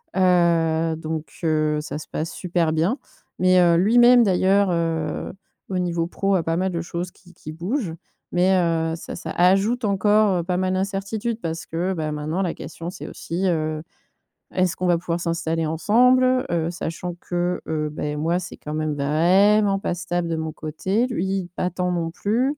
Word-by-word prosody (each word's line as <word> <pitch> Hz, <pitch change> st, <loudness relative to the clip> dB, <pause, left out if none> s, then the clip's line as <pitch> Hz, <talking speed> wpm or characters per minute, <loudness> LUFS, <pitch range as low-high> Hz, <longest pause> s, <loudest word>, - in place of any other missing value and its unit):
heu 165 Hz, -3 st, +3 dB
donc 160 Hz, 0 st, -4 dB, 0.2 s
heu, 155 Hz, -1 st, +1 dB
ça 150 Hz, -1 st, -5 dB
se 155 Hz, -, -9 dB
passe 160 Hz, +1 st, -4 dB
super 170 Hz, -3 st, 0 dB
bien 180 Hz, -, +1 dB, 0.4 s
mais 185 Hz, 0 st, +5 dB
heu, 170 Hz, -1 st, +5 dB
lui-même, 240 Hz, +5 st, +6 dB
d'ailleurs, 195 Hz, 0 st, +3 dB
heu, 165 Hz, -2 st, -2 dB, 0.4 s
au 185 Hz, -1 st, -1 dB
niveau 170 Hz, -2 st, 0 dB
pro 195 Hz, +2 st, 0 dB
a 170 Hz, -, +1 dB
pas 165 Hz, 0 st, 0 dB
mal 190 Hz, 0 st, 0 dB
de 170 Hz, -1 st, -2 dB
choses 175 Hz, +1 st, -4 dB
qui 180 Hz, -1 st, -20 dB
qui 155 Hz, -, -9 dB
bougent 175 Hz, -, -3 dB, 0.4 s
mais 180 Hz, +2 st, +3 dB
heu, 165 Hz, -2 st, +1 dB
ça, 165 Hz, -, -8 dB
ça -, -, -6 dB
ajoute 195 Hz, +7 st, +3 dB
encore 200 Hz, -2 st, +3 dB
pas 180 Hz, -1 st, 0 dB
mal 185 Hz, 0 st, 0 dB
d'incertitude 200 Hz, +4 st, -2 dB
parce 165 Hz, 0 st, -4 dB
que, 175 Hz, +4 st, -2 dB
bah, 155 Hz, -3 st, -3 dB
maintenant, 155 Hz, +5 st, -2 dB
la 175 Hz, -, -1 dB
question, 170 Hz, +1 st, -7 dB
c'est 185 Hz, -, -8 dB
aussi, 185 Hz, +3 st, -3 dB
heu: 155 Hz, -2 st, -1 dB, 0.7 s
est-ce 185 Hz, -1 st, +1 dB
qu'on 185 Hz, -, -3 dB
va 175 Hz, -1 st, +4 dB
pouvoir 170 Hz, -1 st, -2 dB
s'installer 165 Hz, -1 st, -1 dB
ensemble? 250 Hz, -, +3 dB
Heu, 165 Hz, -1 st, 0 dB
sachant 175 Hz, 0 st, -5 dB
que, 175 Hz, 0 st, -2 dB
heu, 155 Hz, -1 st, -1 dB
bah 150 Hz, -, -5 dB
et 150 Hz, 0 st, -2 dB
moi, 165 Hz, +3 st, +1 dB
c'est -, -, -8 dB
quand 150 Hz, -, -7 dB
même 155 Hz, -1 st, -1 dB
vraiment 195 Hz, +8 st, +3 dB
pas 180 Hz, -, -2 dB
stable 175 Hz, -1 st, -2 dB
de 165 Hz, -, 0 dB
mon 160 Hz, 0 st, -3 dB
côté. 190 Hz, +11 st, -1 dB
Lui, 190 Hz, -5 st, -2 dB
pas 180 Hz, -, -1 dB
tant 180 Hz, 0 st, -1 dB
non 165 Hz, -2 st, -2 dB
plus. 245 Hz, -, 0 dB
175 Hz, 185 wpm, -23 LUFS, 165-195 Hz, 0.7 s, lui-même